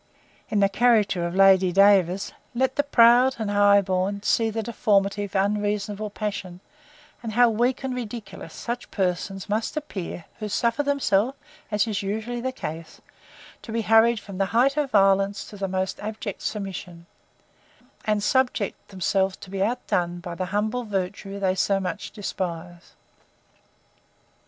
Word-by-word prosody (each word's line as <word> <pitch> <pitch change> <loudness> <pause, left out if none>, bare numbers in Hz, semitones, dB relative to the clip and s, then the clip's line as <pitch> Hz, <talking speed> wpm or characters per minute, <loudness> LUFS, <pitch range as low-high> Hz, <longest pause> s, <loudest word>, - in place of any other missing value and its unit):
In 205 - +1
the 200 - +5
character 200 -5 +2
of 170 - -6
Lady 190 -1 +5
DAVERS, 195 0 +3 0.2
let 260 +2 +1
the 285 - +3
proud, 250 -1 +5
and 220 -3 -3
the - - -2
high 205 0 +5
born, 190 +1 -1
see 225 +1 +2
the 220 0 -3
deformity 205 -3 +1
of 200 - -12
unreasonable 205 +1 -1
passion, 200 -4 -5 0.6
and 225 -2 -5
how 240 +1 +5
weak 240 +4 0
and 265 -1 -2
ridiculous 235 -4 -7
such 240 +1 -5
persons 190 +1 -2
must 220 +7 -2
appear, 190 - -5
who 215 -1 -4
suffer 235 +6 +1
themselves, 275 -4 +1 0.3
as 210 0 +1
is 215 -3 -2
usually 220 +4 -3
the 260 +1 -2
case, 160 -8 -7 0.6
to 230 - -9
be 225 0 -1
hurried 225 +1 +4
from 200 -2 -9
the 195 - +2
height 270 +3 +4
of 295 -2 0
violence, 195 -1 +3
to - - -10
the 195 -1 -3
most 190 0 -2
abject 210 -1 -5
submission; 190 -4 -5 1.0
and 210 -1 0
subject 250 -4 0
themselves 190 0 0
to 190 - -12
be 195 -1 -3
outdone 180 -6 -1
by 175 0 -7
the 185 +2 -3
humble 215 +5 -1
virtue 195 -1 -4
they 190 -2 +1
so 195 +1 +1
much 180 -3 -4
despise. 175 -4 -6
205 Hz, 155 wpm, -24 LUFS, 190-230 Hz, 1.0 s, the